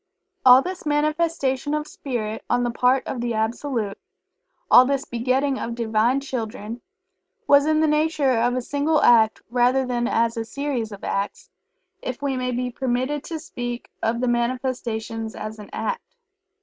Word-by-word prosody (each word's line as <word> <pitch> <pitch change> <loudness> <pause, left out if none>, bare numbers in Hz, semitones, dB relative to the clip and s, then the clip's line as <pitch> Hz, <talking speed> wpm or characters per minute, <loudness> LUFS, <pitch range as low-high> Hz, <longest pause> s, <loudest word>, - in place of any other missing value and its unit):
All 255 +1 +8
this 370 0 -5
manifestation 300 -2 0
of 300 0 -2
Spirit 225 -8 -4
on 245 - +2
the 240 - 0
part 250 +2 +2
of 250 - -4
the 240 -1 -1
Absolute 220 -1 -2 0.7
all 250 - +10
this 275 +1 -1
begetting 260 +3 0
of 235 - -4
Divine 230 +3 +1
Children 230 -3 -5 0.6
was 285 +1 +5
in 310 0 +3
the 315 - +3
nature 300 -2 +2
of 240 +1 +2
a 255 - -2
single 290 +4 +1
act 220 -2 +5
rather 250 +2 +3
than 240 -1 -1
as 230 -1 +1
a 225 - -1
series 250 -2 -3
of 200 - -10
acts, 200 +1 -3 0.5
if - - -4
we 280 -2 -1
may 250 0 -1
be 250 0 -2
permitted 260 +4 -1
to 325 - -4
speak 245 -6 -6
of 235 +2 0
the 255 - +1
manifestation 240 -2 -2
as 215 +1 -6
an 210 - -10
act. - - -2
250 Hz, 160 wpm, -23 LUFS, 230-280 Hz, 0.7 s, all